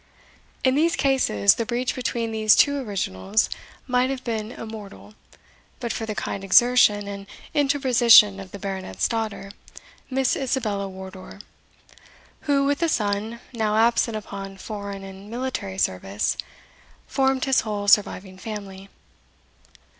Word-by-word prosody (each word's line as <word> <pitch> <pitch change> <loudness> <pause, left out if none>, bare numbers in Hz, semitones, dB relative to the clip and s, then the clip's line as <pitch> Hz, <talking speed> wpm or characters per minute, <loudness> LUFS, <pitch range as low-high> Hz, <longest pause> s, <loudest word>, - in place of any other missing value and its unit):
In 260 - +4
these 325 +5 +2
cases, 180 - +3
the - - -2
breach 245 +1 -1
between 235 -2 -2
these 215 -1 +4
two 285 -1 +4
originals 200 - -1 0.3
might 250 0 +1
have 265 -1 -4
been 220 -2 -3
immortal, 205 - -10 0.7
but 235 - -3
for 225 - -4
the 215 - -3
kind 200 - -4
exertion 210 -1 +5
and 200 0 -7 0.3
interposition 250 -8 +5
of 195 -1 -9
the 200 - -8
Baronet's 190 - -3
daughter, 220 -3 -4 0.6
Miss 265 -1 +1
Isabella 220 -7 -2
Wardour, 190 +1 -10 1.1
who, 280 -1 +3
with 285 +2 0
a 335 - +2
son, 215 -1 -1
now 215 -2 0
absent 230 0 +2
upon 195 -2 -8
foreign 200 -1 -7
and 195 +1 -11
military 230 -5 -4
service, 95 - -1 0.7
formed 265 -1 +1
his 270 -1 +3
whole 205 -2 -4
surviving 195 -2 +2
family. 195 -2 -8
215 Hz, 130 wpm, -24 LUFS, 195-250 Hz, 1.1 s, exertion